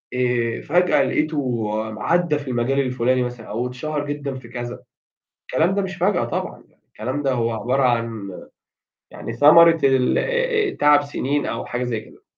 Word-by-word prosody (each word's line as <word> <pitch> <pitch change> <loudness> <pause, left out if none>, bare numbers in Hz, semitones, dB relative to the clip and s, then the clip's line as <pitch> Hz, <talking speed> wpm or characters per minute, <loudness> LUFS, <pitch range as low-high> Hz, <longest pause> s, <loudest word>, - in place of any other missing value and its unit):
آآ، 120 -2 0
فجأة 180 +4 +2
لقيته 135 -8 -1 0.2
م 110 - -9
عدّى 165 +5 +1
في 145 - -10
المجال 125 +2 0
الفُلاني 125 -1 +1
مثلًا 120 -2 -6
أو 115 +4 -2
اتشهر 145 +4 -4
جدًا 145 -2 -4
في 130 -2 -10
كذا. 120 0 -7 0.7
الكلام 165 +8 +1
ده 200 - +1
مش 190 -1 -5
فجأة 180 +2 +1
طبعًا - - -5
يعني، - - -34
الكلام 130 +7 -4
ده 135 - +1
هو 115 -2 0
عبارة 125 +5 0
عن 115 -5 -1 0.8
يعني - - -7
ثمرة 165 +3 +6
ال 135 -2 +3
آآ - - +1 0.5
آآ - - -10
تعب 145 0 +5
سنين 145 0 -2
أو - - -4
حاجة 125 +1 -3
زي 120 -3 -2
كده. - - -18
130 Hz, 175 wpm, -21 LUFS, 120-145 Hz, 0.8 s, ثمرة